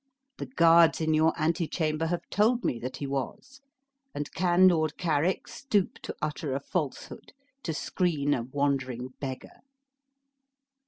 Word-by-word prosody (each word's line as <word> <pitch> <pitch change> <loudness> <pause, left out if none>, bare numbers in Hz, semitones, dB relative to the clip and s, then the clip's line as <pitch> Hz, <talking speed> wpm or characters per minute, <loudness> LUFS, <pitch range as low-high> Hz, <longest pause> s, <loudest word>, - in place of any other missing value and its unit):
The - - -4
guards 165 -7 +5
in 160 -1 +1
your 160 +1 +4
antechamber 160 -1 0
have 175 +1 -3
told 235 +4 +2
me 120 - 0
that 125 +2 -5
he 145 - -4
was; 140 - -5 0.5
and 145 - -4
can 180 +1 +4
Lord 160 -3 +2
Carrick 170 +1 0
stoop 210 -9 -1
to - - -6
utter 150 -2 -2
a - - -1
falsehood 145 0 -5 0.3
to 165 - -3
screen 150 -3 0
an 120 -2 -3
wandering 130 -3 -1
beggar?" 130 -2 -7
155 Hz, 140 wpm, -28 LUFS, 140-175 Hz, 0.5 s, guards